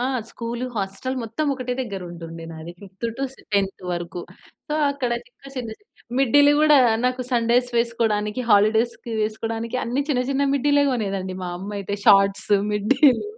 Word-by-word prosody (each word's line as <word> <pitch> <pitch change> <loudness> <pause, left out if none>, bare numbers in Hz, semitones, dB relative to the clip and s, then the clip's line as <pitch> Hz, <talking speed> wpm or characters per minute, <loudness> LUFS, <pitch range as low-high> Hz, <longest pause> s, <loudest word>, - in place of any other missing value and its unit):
ఆ! - - 0 0.3
School, 235 +1 -4
hostel 195 +6 -3
మొత్తం 230 +7 -3
ఒకటే 255 -1 -4
దగ్గర 200 -7 -4
ఉంటుండే 165 -1 -8
నాది. 160 +2 -8
ఫిఫ్త్ 195 +3 -6
టూ 275 - 0
సె - - -19
టెంత్ 195 -2 0
వరకు. 175 0 -4 0.5
సో, 300 - -1 0.2
అక్కడ 265 -4 -2 0.2
చిన్న 275 - -15
చిన్న, 235 -3 -4 0.5
మిడ్డీలు 285 +2 +5
గూడా 300 -2 +6 0.3
నాకు 255 0 +1
సండేస్ 240 +1 +2
వేసుకోవడానికి 225 -1 0
హాలిడేస్‌కి 220 +3 +3
వేసుకోవడానికి 225 +2 -3
అన్నీ 255 +4 0
చిన్న, 250 -2 +2
చిన్న 275 +1 +1
మిడ్డీలే 285 +1 +3
కొనేదండి 195 -5 -2
మా 180 - -4
అమ్మ 195 +3 -6
అయితే. 200 +1 -3
షార్ట్స్, 195 0 +5 0.2
మిడ్డీలు. 265 - +3
230 Hz, 155 wpm, -23 LUFS, 200-255 Hz, 0.5 s, గూడా